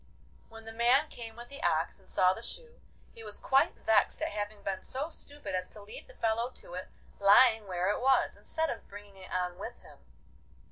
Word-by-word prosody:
When 225 Hz, -1 st, -12 dB
the 225 Hz, -, -7 dB
man 250 Hz, +7 st, +4 dB
came 225 Hz, -2 st, -9 dB
with 240 Hz, +1 st, -10 dB
the 280 Hz, 0 st, -9 dB
ox -, -, +1 dB
and -, -, -14 dB
saw 185 Hz, 0 st, +4 dB
the 225 Hz, -, -8 dB
shoe, 475 Hz, -, -7 dB, 0.3 s
he 225 Hz, -, -11 dB
was 210 Hz, -1 st, -6 dB
quite 270 Hz, +4 st, +3 dB
vexed 220 Hz, -, +2 dB
at -, -, 0 dB
having 205 Hz, 0 st, -4 dB
been 190 Hz, -1 st, -2 dB
so 280 Hz, +5 st, -3 dB
stupid 290 Hz, -, -8 dB
as 185 Hz, 0 st, -1 dB
to 210 Hz, -, -11 dB
leave 205 Hz, -, -9 dB
the -, -, -15 dB
fellow 230 Hz, +2 st, 0 dB
to -, -, -11 dB
it 185 Hz, +1 st, -5 dB, 0.3 s
lying 215 Hz, +2 st, +6 dB
where 180 Hz, +1 st, +1 dB
it -, -, -2 dB
was, 265 Hz, +1 st, +3 dB
instead 320 Hz, -1 st, -2 dB
of -, -, -7 dB
bringing 205 Hz, 0 st, -11 dB
it 185 Hz, -, -11 dB
on 180 Hz, -1 st, -1 dB
with -, -, -7 dB
him. -, -, -15 dB
225 Hz, 215 wpm, -31 LUFS, 200-260 Hz, 0.3 s, lying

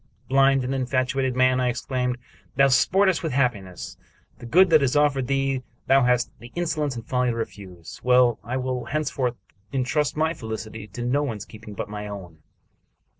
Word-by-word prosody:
"Blind 135 Hz, 0 st, +4 dB
and 130 Hz, +2 st, -2 dB
infatuated 130 Hz, 0 st, 0 dB
man!" 130 Hz, 0 st, +3 dB
I 125 Hz, -, +2 dB
exclaimed. 125 Hz, 0 st, -2 dB, 0.4 s
"Thou 140 Hz, +1 st, +5 dB
sportest 190 Hz, +7 st, +3 dB
with 160 Hz, -6 st, -3 dB
happiness. 95 Hz, -9 st, -2 dB, 0.4 s
The 120 Hz, -, -9 dB
good 180 Hz, +7 st, +5 dB
that 155 Hz, -2 st, +6 dB
is 135 Hz, 0 st, +1 dB
offered 140 Hz, -3 st, +2 dB
thee 135 Hz, -1 st, 0 dB, 0.2 s
thou 135 Hz, +1 st, +5 dB
hast 125 Hz, -1 st, +2 dB
the 120 Hz, +2 st, -12 dB
insolence 155 Hz, -5 st, -1 dB
and 115 Hz, -1 st, -7 dB
folly 125 Hz, 0 st, +1 dB
to 115 Hz, -, -1 dB
refuse. 95 Hz, -7 st, -7 dB
Well, 125 Hz, -2 st, +4 dB
I 125 Hz, +3 st, -3 dB
will 130 Hz, -2 st, -2 dB
hence 155 Hz, +3 st, -2 dB
forth 125 Hz, -3 st, -1 dB, 0.4 s
intrust 140 Hz, +3 st, 0 dB
my 160 Hz, +1 st, +1 dB
felicity 110 Hz, -4 st, -7 dB
to 115 Hz, +4 st, -7 dB
no 135 Hz, +4 st, +1 dB
one's 115 Hz, -8 st, -4 dB
keeping 105 Hz, -1 st, -11 dB
but -, -, -4 dB
my 105 Hz, 0 st, -6 dB
own." 90 Hz, -6 st, -9 dB
125 Hz, 175 wpm, -24 LUFS, 115-135 Hz, 0.4 s, that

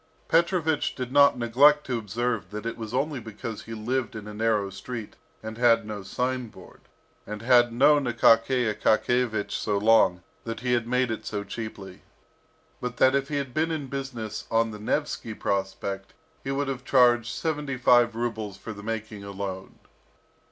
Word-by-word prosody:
Petrovich 165 Hz, -2 st, +1 dB
did 125 Hz, -1 st, -5 dB
not 140 Hz, -1 st, +5 dB
neglect 140 Hz, +6 st, +4 dB
to 125 Hz, -3 st, -1 dB
observe 110 Hz, -2 st, -2 dB
that 105 Hz, +2 st, -7 dB
it 115 Hz, -, -3 dB
was 110 Hz, -2 st, -7 dB
only 140 Hz, +2 st, -1 dB
because 110 Hz, 0 st, -7 dB
he 115 Hz, -, -7 dB
lived 125 Hz, +3 st, -2 dB
in 105 Hz, -1 st, -7 dB
a 105 Hz, -, -7 dB
narrow 105 Hz, -2 st, 0 dB
street, 110 Hz, +3 st, -7 dB, 0.3 s
and 110 Hz, +1 st, -7 dB
had 120 Hz, -3 st, +4 dB
no 105 Hz, -1 st, -6 dB
signboard, 125 Hz, +4 st, -4 dB, 0.5 s
and 105 Hz, +1 st, -6 dB
had 120 Hz, -1 st, +5 dB
known 140 Hz, +4 st, +4 dB
Akaky 120 Hz, +1 st, +3 dB
Akakiyevich 110 Hz, +1 st, +1 dB
so 105 Hz, -, -1 dB
long, 100 Hz, -4 st, +4 dB, 0.2 s
that 115 Hz, 0 st, -5 dB
he 125 Hz, -1 st, 0 dB
had 120 Hz, -1 st, 0 dB
made 125 Hz, 0 st, +1 dB
it 110 Hz, -, -5 dB
so 105 Hz, -1 st, -3 dB
cheaply; 100 Hz, -3 st, -8 dB, 0.8 s
but 125 Hz, -1 st, -5 dB
that 130 Hz, +2 st, +5 dB
if 140 Hz, 0 st, +1 dB
he 150 Hz, -, -4 dB
had 140 Hz, -3 st, -3 dB
been 160 Hz, +1 st, +1 dB
in 155 Hz, -3 st, -3 dB
business 125 Hz, -6 st, -5 dB
on 115 Hz, 0 st, +2 dB
the 105 Hz, -, -8 dB
Nevsky 115 Hz, -1 st, -2 dB
Prospect, 95 Hz, 0 st, -3 dB, 0.3 s
he 135 Hz, -, -5 dB
would 140 Hz, +1 st, -1 dB
have 130 Hz, -2 st, -4 dB
charged 120 Hz, -3 st, +4 dB
seventy 150 Hz, -4 st, -3 dB
five 120 Hz, -2 st, +4 dB
rubles 110 Hz, -4 st, -3 dB
for 110 Hz, -, -7 dB
the 100 Hz, -, -10 dB
making 105 Hz, -1 st, -5 dB
alone. 95 Hz, -1 st, -6 dB
115 Hz, 170 wpm, -26 LUFS, 105-130 Hz, 0.8 s, not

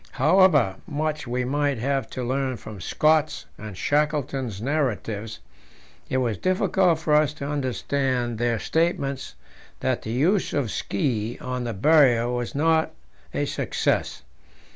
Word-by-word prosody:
However 150 Hz, -, +4 dB
much 150 Hz, -1 st, -2 dB
we 125 Hz, +1 st, -1 dB
might 145 Hz, 0 st, 0 dB
have 135 Hz, 0 st, -1 dB
to 130 Hz, -, -5 dB
learn 130 Hz, 0 st, -1 dB
from 105 Hz, -5 st, -10 dB
Scott's 155 Hz, -, +1 dB
and 105 Hz, -3 st, -9 dB
Shackleton's 140 Hz, -6 st, 0 dB
narratives, 115 Hz, -5 st, -2 dB, 0.7 s
it 130 Hz, -, 0 dB
was 120 Hz, -6 st, 0 dB
difficult 185 Hz, -2 st, +2 dB
for 160 Hz, -1 st, -1 dB
us 150 Hz, -1 st, +4 dB
to 140 Hz, -2 st, -6 dB
understand 130 Hz, -3 st, -1 dB
their 120 Hz, -1 st, +1 dB
statements 140 Hz, -1 st, -1 dB, 0.5 s
that -, -, 0 dB
the -, -, -7 dB
use 170 Hz, -, +1 dB
of 135 Hz, -7 st, 0 dB
ski 110 Hz, +1 st, -2 dB
on 125 Hz, -1 st, -4 dB
the 115 Hz, -, -3 dB
Barrier 125 Hz, -1 st, +4 dB
was 120 Hz, +1 st, -3 dB
not 160 Hz, +2 st, +2 dB, 0.4 s
a -, -, -1 dB
success. -, -, -1 dB
135 Hz, 135 wpm, -24 LUFS, 120-150 Hz, 0.7 s, However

